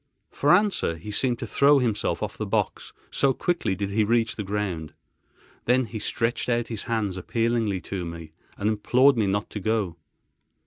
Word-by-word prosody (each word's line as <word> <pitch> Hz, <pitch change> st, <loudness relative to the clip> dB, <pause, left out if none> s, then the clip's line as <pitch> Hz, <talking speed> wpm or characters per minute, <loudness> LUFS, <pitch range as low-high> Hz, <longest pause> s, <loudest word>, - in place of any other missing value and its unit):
For 145 Hz, -, +2 dB
answer 190 Hz, -, +3 dB
he 105 Hz, +6 st, -8 dB
seemed 120 Hz, +3 st, +1 dB
to 115 Hz, -, -5 dB
throw 140 Hz, +5 st, +4 dB
himself 115 Hz, -6 st, 0 dB
off -, -, -4 dB
the -, -, -4 dB
box, -, -, -1 dB, 0.2 s
so 135 Hz, -1 st, +3 dB
quickly 130 Hz, -, -1 dB
did 100 Hz, +1 st, -3 dB
he 110 Hz, +2 st, +2 dB
reach 115 Hz, +1 st, +1 dB
the -, -, -4 dB
ground. 95 Hz, -6 st, -3 dB, 0.7 s
Then 125 Hz, +1 st, +3 dB
he 110 Hz, 0 st, -6 dB
stretched 115 Hz, +4 st, -1 dB
out 120 Hz, -1 st, 0 dB
his 115 Hz, -3 st, -5 dB
hands 105 Hz, -5 st, -1 dB
appealingly 115 Hz, -1 st, 0 dB
to 95 Hz, -1 st, -4 dB
me, 85 Hz, -2 st, -7 dB, 0.3 s
and 100 Hz, -, -1 dB
implored 125 Hz, +6 st, +4 dB
me 110 Hz, -4 st, +1 dB
not 100 Hz, +2 st, -1 dB
to 105 Hz, -, -4 dB
go. 105 Hz, -4 st, -1 dB
110 Hz, 180 wpm, -25 LUFS, 100-120 Hz, 0.7 s, throw